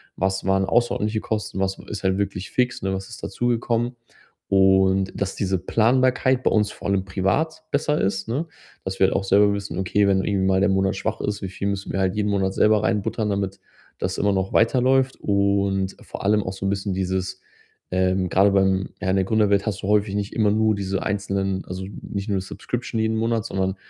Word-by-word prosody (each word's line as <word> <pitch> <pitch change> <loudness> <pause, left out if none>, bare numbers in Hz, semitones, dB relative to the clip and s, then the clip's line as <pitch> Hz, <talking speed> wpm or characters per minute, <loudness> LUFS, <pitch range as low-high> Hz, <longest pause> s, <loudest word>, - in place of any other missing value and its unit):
Was 95 +1 -1
waren 95 0 +2
außerordentliche 110 -1 +1
Kosten? 105 -3 -3
Was 95 0 -1
ist 105 -2 -6
halt 95 0 +1
wirklich 100 -1 -3
fix, 125 -1 0
ne? 95 0 0
Was 95 +2 -5
ist 115 - -10
dazugekommen? 120 0 -1 0.5
Und 95 0 +4
dass 100 -1 -2
diese 95 -1 0
Planbarkeit 125 +6 +2
bei - - +2
uns 105 -1 +2
vor - - -7
allem 100 -1 +1
privat 155 +13 -1
besser 150 +1 +1
ist, 95 +1 -1
ne? 140 +9 -1 0.4
Dass 95 0 -4
wir 95 - +5
halt - - -1
auch - - +1
selber 100 +1 +4
wissen, 100 -2 -4
okay, 100 +2 +2
wenn 95 -1 +2
irgendwie 95 -2 0
mal 95 0 +3
der 100 - +3
Monat 95 0 +1
schwach 110 +3 -3
ist, 105 0 -2
wie 95 - -4
viel 100 +1 -4
müssen 100 0 -3
wir 95 - -2
halt 95 0 +1
jeden 105 0 0
Monat 95 -1 0
selber 105 +1 +3
reinbuttern, 105 +1 0
damit 100 -1 -2 0.4
das - - -2
immer 100 -1 +2
noch 95 0 -1
weiterläuft? 130 +2 +3
Und 100 -1 +1
vor - - -8
allem 105 +1 +3
auch 95 - -4
so 95 - -6
'n - - +1
bisschen 100 0 -2
dieses, 95 0 -2 0.5
ähm, 95 0 +1
grade 100 +3 +4
beim 95 -1 +2
ja, 95 - -1
in 95 - +2
der 95 - +2
Gründerwelt 100 -2 +2
hast 100 -4 -3
du - - -2
häufig 105 -1 +2
nicht 100 0 -3
immer 105 -2 +2
nur 110 0 +2
diese 95 -1 -2
einzelnen 95 -2 -1
also 95 +1 -6 0.2
nicht 100 +1 -5
nur 95 -2 0
Subscription 115 +4 -4
jeden 110 0 0
Monat, 115 -1 0
sondern, 95 -2 -1
100 Hz, 210 wpm, -23 LUFS, 95-110 Hz, 0.5 s, wir